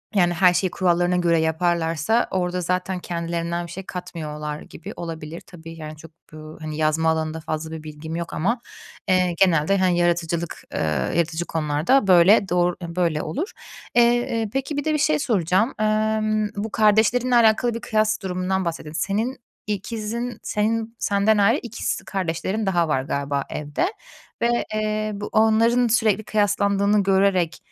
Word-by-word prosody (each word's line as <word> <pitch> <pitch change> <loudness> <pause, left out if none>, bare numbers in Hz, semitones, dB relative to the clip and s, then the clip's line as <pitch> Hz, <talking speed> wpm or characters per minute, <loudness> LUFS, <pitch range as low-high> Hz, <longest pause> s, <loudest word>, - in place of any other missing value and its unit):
Yani 175 -3 +3
her 180 +1 +4
şeyi 185 0 0
kurallarına 175 -1 +1
göre 170 -2 +2
yaparlarsa 165 +5 +1
orada 180 -1 -1
zaten 180 +1 -1
kendilerinden 170 0 -3
bir - - -11
şey 190 +1 -7
katmıyorlar 150 -4 -6
gibi 195 +6 -10
olabilir. 165 -1 -7
Tabii, 165 -2 -12
yani, 155 -1 -7
çok, 160 +1 -13 0.2
eee, 155 - -9 0.2
hani, 155 -1 -6
yazma 155 +1 +2
alanında 160 0 -1
fazla 155 0 -4
bir 160 -1 -7
bilgim 155 +1 -7
yok 170 -1 -5
ama, 230 +9 0 0.5
eee, 185 -2 +2
genelde, 180 0 +3
hani, 185 -2 +2
yaratıcılık, 170 -1 -1
eee, - - -2 0.4
yaratıcı 170 0 0
konularda 160 - +1
böyle, 190 +3 +6
doğru, 175 0 +2
böyle, 170 -1 -1
eee, 150 - -1
olur. 310 - -4 0.4
Eee, 240 0 +6
eee, 230 -3 -1
peki 270 +2 -2
bir 290 - -1
de 310 - +1
bir - - +2
şey 295 +1 +2
soracağım. 205 - +1
Imm, 215 0 +1
bu 210 +2 -4
kardeşlerinle 225 +4 +3
alakalı 235 +1 +4
bir 230 - -5
kıyas 215 0 0
durumundan 185 0 -1
bahsediyosun. 160 -1 -4
Senin 225 +7 -1 0.3
ikizin 225 +3 -4
senin 225 +2 -1
senden 205 +2 +2
ayrı 205 +6 +4
ikiz 230 -2 -3
kardeşlerin 190 +3 -2
daha 175 -4 +1
var 130 -3 +1
galiba 140 0 -2
evde 150 - -2 0.6
ve, 240 0 +1
eee, 215 0 -1
bu 205 0 -5
onların 230 +3 +3
sürekli 220 -2 +2
kıyaslandığını 205 -1 +2
görerek, 190 -3 +2
185 Hz, 155 wpm, -23 LUFS, 165-215 Hz, 0.6 s, böyle